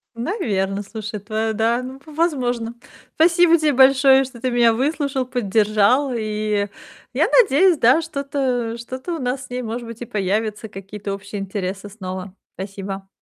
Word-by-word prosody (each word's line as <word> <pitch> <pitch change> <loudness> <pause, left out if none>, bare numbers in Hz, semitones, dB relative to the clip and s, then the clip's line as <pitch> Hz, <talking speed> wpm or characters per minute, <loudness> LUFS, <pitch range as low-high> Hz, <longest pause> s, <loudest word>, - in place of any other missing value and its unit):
Наверно. 205 - -1
Слушай, 210 +1 -6
твоя 220 +2 -2
да, 230 +3 +1
ну, 260 +1 -8
в 310 - -12
возможно. 245 -8 0 0.4
Спасибо 335 +1 +5
те 310 -2 +2
большое, 270 0 +6
что 250 -3 -12
ты 255 0 0
меня 235 -1 +4
выслушал, 275 +1 -1
поддержал. 225 +2 +2
И 215 -2 -1 0.5
я - - +2
надеюсь, 365 - +4
да, 260 +6 +5
что-то 270 -6 -2
что-то 260 +8 -6
у - - -5
нас 255 0 -2
с - - -18
ней, 250 0 -3
может 235 0 -5
быть, 230 0 -9
и - - -4
появятся 210 +1 -2
какие-то 200 +1 -6
общие 200 +1 -6
интересы 195 0 -4
снова. 185 -2 -7 0.2
Спасибо. 195 0 -6
230 Hz, 155 wpm, -21 LUFS, 205-265 Hz, 0.5 s, большое